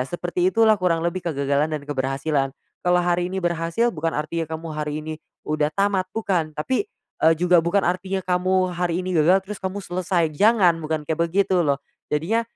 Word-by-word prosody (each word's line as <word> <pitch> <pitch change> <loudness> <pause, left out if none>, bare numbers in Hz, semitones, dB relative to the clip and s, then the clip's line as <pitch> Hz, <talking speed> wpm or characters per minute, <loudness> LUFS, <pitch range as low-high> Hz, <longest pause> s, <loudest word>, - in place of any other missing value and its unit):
seperti 175 +5 -1
itulah 220 +1 +5
kurang 180 -4 +1
lebih 180 +1 -2
kegagalan 140 +1 0
dan 155 - -1
keberhasilan. 135 0 -1 0.3
Kalau 180 0 +3
hari 175 0 0
ini 190 - -3
berhasil 175 +6 0
bukan 165 +1 -1
artinya 160 +2 -2
kamu 160 +1 -5
hari 150 -1 -3
ini 155 +1 -5 0.3
udah 150 0 0
tamat, 195 0 0
bukan, 185 -8 -1
tapi, 255 - -2 0.3
eee, 160 +1 +6
juga 180 -1 +4
bukan 175 +3 +1
artinya 185 +2 -1
kamu 185 0 +1
hari 175 0 -1
ini 185 0 -3
gagal 170 +4 +5
terus 210 -2 -7
kamu 190 +1 -3
selesai, 180 -2 0
jangan, 200 -2 +4
bukan 155 -1 -3
kayak 160 +1 0
begitu 185 +1 +2
loh. 140 -3 +1 0.3
Jadinya, 180 +10 +1
175 Hz, 175 wpm, -23 LUFS, 155-185 Hz, 0.3 s, eee